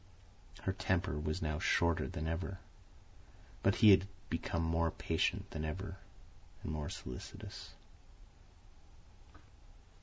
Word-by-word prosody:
Her 95 - +1
temper 90 -6 0
was 75 +1 -1
now 75 -1 0
shorter 85 0 +3
than 80 - -4
ever; 90 +4 -2 1.0
but 100 +2 +4
he 105 - +12
had 95 0 +6 0.2
become 85 - 0
more 80 0 +2
patient - - 0
than 80 - -3
ever 90 +5 -4 0.7
and - - -3
more 75 0 -2
solicitous. 65 -8 -7
80 Hz, 110 wpm, -36 LUFS, 75-95 Hz, 1.0 s, he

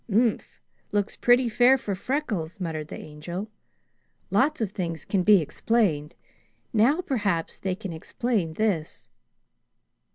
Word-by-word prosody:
"Umph! 225 +2 +1 0.3
Looks 205 -1 0
pretty 245 +1 +4
fair 245 +4 +5
for 215 -6 -3
Freckles," 200 - -3
muttered 160 -4 -3
the - - -7
Angel. 170 +8 -7 0.8
"Lots 305 +1 +2
of 215 -4 -1
things 170 -5 -4
can 195 - +1
be 205 +1 +6
explained; 160 -3 0 0.6
now 245 +10 +4
perhaps 205 - -1
they 190 -1 -2
can 195 -3 -6
explain 185 +1 -2
this." 185 -6 -2
200 Hz, 125 wpm, -26 LUFS, 165-235 Hz, 0.8 s, be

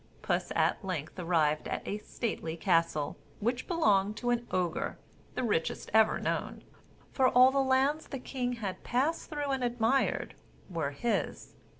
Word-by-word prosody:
Puss - - 0
at - - +2
length 180 -3 -4
arrived 160 -4 +1
at - - -4
a 205 - -2
stately 170 -8 -4
castle, 165 -4 +1 0.2
which 240 +4 -1
belonged 210 - +2
to 245 -1 0
an 240 0 -1
Ogre, 175 -2 -1 0.4
the - - -1
richest 185 -9 -1
ever 220 0 +5
known; - - -3 0.5
for 260 -2 +3
all 255 +1 +7
the 275 - +1
lands 270 +3 +2
the 275 - -5
king 250 -1 -3
had 205 -6 -5
passed 275 +7 0
through 290 -2 -2
and 265 -2 -1
admired 240 +2 +1 0.4
were 160 -5 -1
his. 185 +12 -2
230 Hz, 155 wpm, -31 LUFS, 175-260 Hz, 0.5 s, all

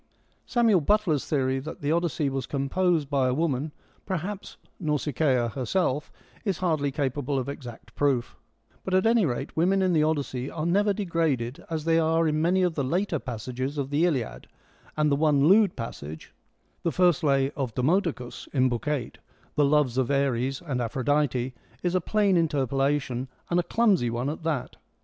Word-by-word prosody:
Samuel 230 -7 +3
Butler's 170 -4 +1
theory 135 -2 +1
that 155 +4 -8
the 145 +1 0
Odyssey 165 -3 0
was 135 -1 -3
composed 150 +3 0
by 135 -2 +1
a 125 - +1
woman, 150 -1 -1 0.3
perhaps 190 +2 -5 0.2
Nausicaa 150 - +1
herself, 140 - -1 0.3
is 195 -6 -1
hardly 155 -6 0
capable 140 0 -1
of 130 - -2
exact 125 -5 -8
proof, 135 -4 0 0.5
but 185 - -1
at 185 - +3
any 225 -5 +4
rate 135 +2 -4
women 190 +4 +2
in 185 -1 +2
the 155 - +3
Odyssey 140 -4 -1
are 155 -1 -4
never 205 +4 +3
degraded 165 - -1
as 160 -2 -3
they 165 0 +3
are 165 0 +2
in 155 0 +1
many 185 +3 +3
of 180 -2 +1
the 145 - -1
later 170 +4 0
passages 130 +4 -4
of 140 -1 -3
the 150 +3 +2
Iliad, 130 -9 -3 0.5
and 150 -1 +2
the - - +4
one 145 -1 +3
lewd 200 +1 +5
passage, 80 -9 -7 0.5
the 170 - 0
first 175 +1 +3
lay 135 -2 +2
of 135 -6 -4
Demodocus 145 -3 -1
(in 130 -2 +3
Book 120 +3 -3
8), 145 -5 -2 0.2
' - - -33
the 145 - +4
loves 140 -3 +2
of 130 - 0
Ares 135 0 0
and 135 -7 -2
Aphrodite,' 130 +1 0 0.3
is 175 -1 0
a 185 - +2
plain 200 0 +2
interpolation, 135 -4 0 0.2
and 175 - +3
a - - +4
clumsy 195 - +2
one 120 +4 -2
at 155 - -7
that. 155 -6 -3
150 Hz, 175 wpm, -26 LUFS, 130-170 Hz, 0.5 s, lewd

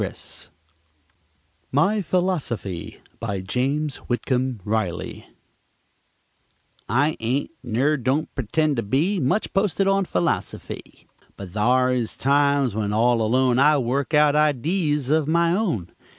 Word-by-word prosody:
] 75 0 -41
MY 195 +10 +2
PHILOSOFY 155 - -2 0.2
BY 100 -5 -3
JAMES 135 +8 -1
WHITCOMB 125 0 -1
RILEY 105 -5 -3 1.6
I 145 +7 +2
ain't, 125 +5 -1
ner 130 +6 +1
don't 135 +4 0
p'tend 145 +3 0
to - - +1
be, 150 - 0
Much 150 +10 0
posted 195 -1 +1
on 195 0 +2
philosofy; 90 -1 -3 0.3
But 100 -2 -8
thare 125 +5 +2
is 125 -3 -2
times, 140 -2 +2
when 105 -1 -2
all 115 +2 +2
alone, 125 +3 +2
I 150 +2 +5
work 135 +4 -1
out 150 -1 +5
idees 150 0 +1
of 155 -1 +2
my 170 +2 +2
own. 165 - -1
130 Hz, 120 wpm, -23 LUFS, 110-155 Hz, 1.6 s, I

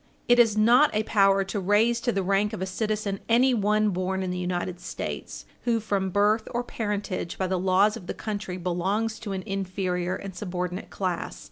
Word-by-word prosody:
It 245 0 +5
is 225 -3 +5
not 240 +7 +6
a 215 - +2
power 195 -2 +3
to 195 +2 -3
raise 215 +5 +2
to 240 - +1
the 195 -3 -1
rank 200 +3 +1
of 215 - -5
a - - -1
citizen 205 0 -2
anyone 215 -4 +3
born 185 +1 -1
in 185 - -2
the 180 - -3
United 180 0 -2
States - - -6 0.2
who, 235 -2 +2
from 200 -3 -1
birth 210 +3 +2
or 240 - 0
parentage, 205 -6 -3
by 190 - 0
the 185 0 0
laws 190 +3 +3
of 195 -6 -10
the - - -4
country, 205 -4 -4
belongs 190 +5 -1
to 210 - -6
an 190 -1 -4
inferior 185 -2 -2
and 195 -2 -7
subordinate 180 -1 -4
class. 185 -3 -3
195 Hz, 195 wpm, -26 LUFS, 185-215 Hz, 0.2 s, not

